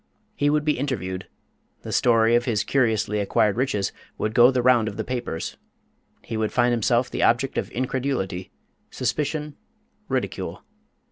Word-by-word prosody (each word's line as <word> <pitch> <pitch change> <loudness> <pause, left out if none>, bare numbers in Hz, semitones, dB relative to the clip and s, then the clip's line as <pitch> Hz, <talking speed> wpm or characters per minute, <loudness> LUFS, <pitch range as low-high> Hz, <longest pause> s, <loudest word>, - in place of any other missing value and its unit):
He 145 +1 +2
would 150 0 +1
be 150 -4 +1
interviewed; 95 -10 -3 0.6
the - - -6
story 115 -1 +4
of 120 0 +3
his 110 -6 +1
curiously 110 -5 +1
acquired 100 0 +2
riches 115 -6 0 0.3
would 105 0 -2
go 120 +2 +7
the 130 -2 0
round 120 -3 +4
of 105 - -5
the - - -2
papers; 120 -10 -4 0.7
he - - -5
would 110 -1 -1
find 120 0 +3
himself 120 +1 +1
the - - -2
object 125 +3 +2
of - - -2
incredulity, 125 -8 -2 0.4
suspicion, 150 0 -2 0.5
ridicule. - - -3
120 Hz, 150 wpm, -24 LUFS, 105-130 Hz, 0.7 s, go